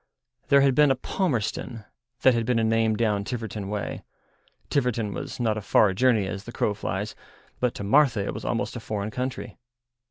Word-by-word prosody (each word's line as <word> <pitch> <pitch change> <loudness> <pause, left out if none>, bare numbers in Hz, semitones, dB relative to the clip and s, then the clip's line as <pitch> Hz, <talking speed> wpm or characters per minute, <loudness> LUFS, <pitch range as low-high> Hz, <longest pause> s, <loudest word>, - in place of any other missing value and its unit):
There 140 -1 +6
had 135 -1 +4
been 150 +2 +5
a 135 - +3
Palmerston, 120 - -2 0.4
that 130 - +7
had 115 -1 0
been 120 +1 +1
a 115 - +2
name 110 0 +2
down 105 -2 +1
Tiverton 110 -3 -5
way; 105 -1 -4 0.7
Tiverton 115 -6 0
was - - -6
not 110 -3 +1
a - - -8
far 100 0 +3
journey 115 -1 +3
as 95 +1 -5
the 120 - -7
crow 105 - 0
flies, 100 0 -4 0.5
but 125 -1 0
to - - -5
Martha 120 -2 +3
it - - -3
was - - -7
almost - - -2
a - - -4
foreign 105 0 -4
country. 130 +3 -5
115 Hz, 190 wpm, -25 LUFS, 105-125 Hz, 0.7 s, that